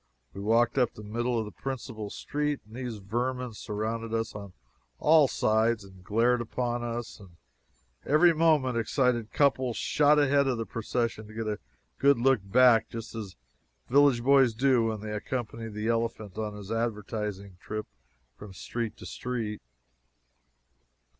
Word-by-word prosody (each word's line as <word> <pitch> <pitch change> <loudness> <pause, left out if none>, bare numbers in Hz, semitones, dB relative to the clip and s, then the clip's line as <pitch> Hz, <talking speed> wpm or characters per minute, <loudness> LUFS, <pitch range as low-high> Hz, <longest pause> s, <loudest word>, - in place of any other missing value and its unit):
We 100 - -7
walked 115 +4 +2
up 125 - +1
the 105 - -10
middle 120 +3 -1
of 110 - -1
the 105 - -8
principal 120 -5 -6
street, 150 +5 -2
and 110 +2 -14
these 125 -3 -5
vermin 120 +4 -3
surrounded 110 +2 -3
us 115 0 -2
on 100 -3 -9 0.4
all 155 - +5
sides 110 -1 +1
and 95 -2 -15
glared 115 +4 +2
upon 120 +1 -2
us; 120 0 -5
and 90 -4 -16 0.7
every 160 +4 +5
moment 155 -7 +3
excited 120 -1 0
couples 130 -4 +2
shot 150 0 +3
ahead 140 -1 +3
of 130 -3 0
the 115 - -3
procession 115 -1 -3
to 110 - -13
get 115 0 -3
a 105 -1 -2 0.4
good 140 0 +5
look 130 +1 +3
back, 115 +3 +5
just 115 -1 -7
as 105 -5 -7 0.5
village 135 -2 +4
boys 135 -3 +5
do 125 -1 +3
when 110 -2 -3
they 105 0 -5
accompany 115 +1 -4
the 105 +1 -4
elephant 115 -4 -2
on 105 -1 -4
his 105 0 -9
advertising 105 -4 -3
trip 105 +2 -5 0.5
from 105 -2 -11
street 115 +3 -4
to - - -11
street. 115 -4 -4
115 Hz, 155 wpm, -28 LUFS, 105-125 Hz, 0.7 s, all